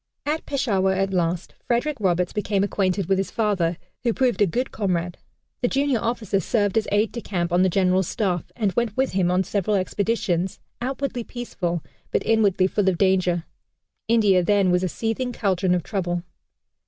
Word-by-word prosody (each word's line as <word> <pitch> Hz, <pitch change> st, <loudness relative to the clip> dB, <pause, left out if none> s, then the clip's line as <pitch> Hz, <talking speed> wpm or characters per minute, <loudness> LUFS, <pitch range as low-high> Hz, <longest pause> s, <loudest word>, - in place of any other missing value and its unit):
At 305 Hz, +2 st, -2 dB
Peshawar 200 Hz, -9 st, +1 dB
at 195 Hz, 0 st, 0 dB
last 175 Hz, -1 st, -1 dB
Frederick 265 Hz, +5 st, 0 dB
Roberts 180 Hz, -2 st, +1 dB
became 205 Hz, -2 st, 0 dB
acquainted 195 Hz, -1 st, 0 dB
with 190 Hz, +2 st, +1 dB
his 195 Hz, -, -1 dB
father, 185 Hz, -7 st, 0 dB, 0.2 s
who 235 Hz, -2 st, +1 dB
proved 255 Hz, -4 st, +1 dB
a 205 Hz, -, +5 dB
good 245 Hz, +9 st, -2 dB
comrade. 180 Hz, -4 st, -2 dB, 0.4 s
The 245 Hz, -, +2 dB
junior 275 Hz, -2 st, +1 dB
officer 215 Hz, -4 st, -1 dB
served 205 Hz, +1 st, 0 dB
as 220 Hz, -1 st, +1 dB
aide 205 Hz, +1 st, +2 dB
de 235 Hz, -, -5 dB
camp 175 Hz, -4 st, -2 dB
on 175 Hz, -, +4 dB
the 190 Hz, -, +4 dB
general's 185 Hz, 0 st, +2 dB
staff, 180 Hz, -6 st, -1 dB
and 210 Hz, -5 st, 0 dB
went 235 Hz, +1 st, -1 dB
with 265 Hz, 0 st, +1 dB
him 185 Hz, -2 st, +1 dB
on 180 Hz, +1 st, +2 dB
several 200 Hz, +2 st, 0 dB
expeditions, 190 Hz, -2 st, -1 dB, 0.2 s
outwardly 260 Hz, -1 st, -2 dB
peaceful, 180 Hz, -9 st, -4 dB, 0.3 s
but -, -, -1 dB
inwardly 205 Hz, -4 st, +3 dB
full 195 Hz, +1 st, +2 dB
of 180 Hz, -, -1 dB
danger. 185 Hz, -3 st, +2 dB, 0.6 s
India 210 Hz, -5 st, +4 dB
then 200 Hz, -1 st, +3 dB
was 180 Hz, 0 st, +3 dB
a 185 Hz, -, 0 dB
seething 230 Hz, +6 st, -2 dB
caldron 185 Hz, -4 st, +1 dB
of 175 Hz, -, -1 dB
trouble. 175 Hz, -3 st, -2 dB
195 Hz, 180 wpm, -23 LUFS, 180-225 Hz, 0.6 s, a